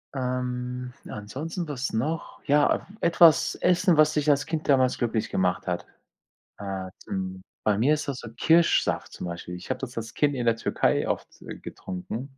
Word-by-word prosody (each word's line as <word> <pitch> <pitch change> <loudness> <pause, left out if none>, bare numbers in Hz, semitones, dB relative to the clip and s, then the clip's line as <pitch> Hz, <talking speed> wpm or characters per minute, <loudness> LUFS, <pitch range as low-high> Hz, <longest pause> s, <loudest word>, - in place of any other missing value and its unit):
Ähm, 125 -1 -3 0.2
ansonsten, 150 - -5
was 135 -3 -3
noch? 150 +9 -2
Ja 145 0 +4
af - - 0
etwas 170 -1 +5
essen, 180 -1 +3
was 155 0 +5
dich 150 -1 +1
als 145 -1 +3
Kind 160 0 -3
damals 130 -2 +4
glücklich 115 -2 -1
gemacht 90 0 0
hat? 90 -1 -2 0.7
Äh, 95 -2 -5
zum 95 -1 -5 0.2
bei 105 -2 +2
mir 135 +7 +4
ist 150 - -5
das 135 -3 -3
so 115 - -8
Kirschsaft 165 +8 +3
zum - - -6
Beispiel. 85 +1 -6
Ich 90 - -10
habe - - -1
das 130 -2 -7
als 115 0 -5
Kind 145 -2 +2
in 120 - -2
der 115 -1 +4
Türkei - - +1
oft, - - -4
äh, - - -8
getrunken. 115 +9 -7
125 Hz, 180 wpm, -26 LUFS, 110-150 Hz, 0.7 s, etwas